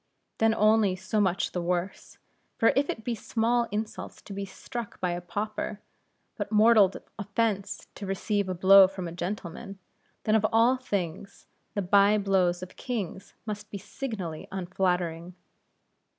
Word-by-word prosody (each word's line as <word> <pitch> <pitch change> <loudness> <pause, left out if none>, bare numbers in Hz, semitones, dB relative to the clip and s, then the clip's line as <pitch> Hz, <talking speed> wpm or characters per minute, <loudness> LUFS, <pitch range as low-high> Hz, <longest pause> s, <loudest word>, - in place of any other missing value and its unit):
Then 225 0 +4
only 215 -3 +4
so 190 +3 -1
much 190 -2 +1
the 180 - -2
worse; 180 +2 -3 0.4
for 225 - +4
if 280 +2 +2
it 225 - -3
be 240 - -1
small 235 +1 0
insult 215 +2 -4
to 200 - -8
be 200 0 -4
struck 235 +3 -7
by 180 -1 0
a 175 0 -3
pauper, 210 +3 -4 0.6
but - - -4
mortal 215 -2 +6 0.3
offense 200 -2 -1
to 200 - -7
receive 200 +1 -1
a 185 - -2
blow 190 +2 +8
from 185 -2 -6
a - - -6
gentleman, 180 +2 -5 0.5
then 215 - +1
of 220 -1 +4
all 230 +3 +5
things 195 -7 -4 0.3
the 200 - 0
bye 200 +3 +5
blows 185 -3 +1
of 185 - -10
kings 205 -7 -5
must 210 -2 -5
be 200 - -5
signally 195 - -6
unflattering. 180 -2 -1
200 Hz, 150 wpm, -28 LUFS, 185-215 Hz, 0.6 s, blow